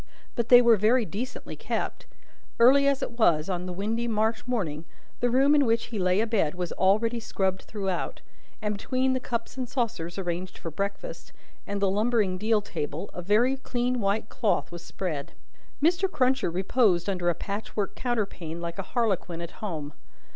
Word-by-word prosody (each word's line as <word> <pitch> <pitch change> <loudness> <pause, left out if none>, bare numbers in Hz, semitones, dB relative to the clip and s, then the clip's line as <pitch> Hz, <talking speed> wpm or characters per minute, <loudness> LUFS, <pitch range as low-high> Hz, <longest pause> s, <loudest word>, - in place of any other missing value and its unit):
But 235 -1 -2
they 245 0 +9
were 235 -2 +6
very 225 +4 +3
decently 230 - -5
kept. - - -3 0.5
Early 275 +4 +7
as 280 -1 +2
it 235 0 -6
was, 165 -6 +3
on 180 0 -3
the - - -3
windy 220 +6 -2
March 220 +1 0
morning, 170 -11 -2 0.4
the 245 - +2
room 270 +4 +4
in 290 -1 +5
which 230 -2 +1
he 215 - -1
lay 185 +2 +3
abed 215 -9 +1
was 180 -1 -3
already 220 +5 +2
scrubbed 190 -4 -1
throughout; 195 -4 -3 0.4
and 210 0 0
between 260 +5 0
the 255 - 0
cups 235 0 -4
and 255 -2 -3
saucers 200 -10 -2
arranged 180 0 -3
for 165 - -6
breakfast, 200 - -5 0.3
and 200 0 -2
the 200 - +2
lumbering 210 -3 +1
deal 215 +1 +2
table, 160 -2 -5
a 180 - -5
very 225 +8 +3
clean 250 -1 -1
white 205 +1 0
cloth 220 -6 0
was 175 0 -8
spread. 160 -8 -4 0.5
Mr. 350 +4 +3
Cruncher 260 - +2
reposed 185 0 +2
under 180 -3 0
a 170 - +1
patchwork 205 0 -3
counterpane, 195 -9 -3
like 170 +1 -5
a 195 - -6
Harlequin 195 -7 0
at 170 0 -6
home. 155 -8 -4
210 Hz, 175 wpm, -27 LUFS, 180-240 Hz, 0.5 s, they